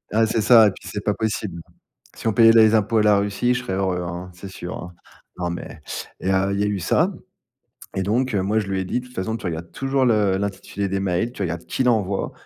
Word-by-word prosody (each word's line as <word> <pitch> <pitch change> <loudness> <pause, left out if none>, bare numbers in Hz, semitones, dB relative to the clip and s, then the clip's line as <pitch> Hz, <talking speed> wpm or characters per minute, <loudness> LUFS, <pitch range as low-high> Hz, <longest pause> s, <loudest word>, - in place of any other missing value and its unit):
Ah, 110 0 +4
c'est 110 0 0
ça 115 0 +7
et - - +2
puis - - -13
c'est 105 -1 -5
pas 105 -1 0
possible! 105 -5 -3 0.6
Si - - -9
on 110 - 0
payait 115 -1 +7
les 110 -1 +6
impôts 110 +1 +2
à - - +4
la 105 -1 +5
Russie, 100 +5 +1
je 125 - -2
serais 95 - -4
heureux, 95 -2 -1
hein, 90 +1 -6
c'est 95 +2 -9
sûr, 90 -1 -7
hein. 90 0 -8 0.4
Non, 90 -1 -1
mais 85 - -7 0.4
et 95 - -1
heu, 95 +1 +2
il 100 - -1
y - - +2
a - - +1
eu 105 -2 -1
ça - - +2 0.8
et 95 - 0
donc 120 +6 0
heu, 100 - +1
moi, 100 +3 0
je 105 - -3
lui 95 -1 -1
ai 95 - -2
dit: 95 - -1
«De - - -14
toute 125 - -16
façon, 110 +4 -2
tu - - -10
regardes 85 -1 -4
toujours 135 0 0
le 105 -5 +3
l'intitulé 100 0 -3
des 95 +1 -1
mails, 95 +5 -1
tu 105 - -8
regardes 85 -1 -4
qui - - -1
l'envoie 105 -6 +1
100 Hz, 260 wpm, -22 LUFS, 95-110 Hz, 0.8 s, ça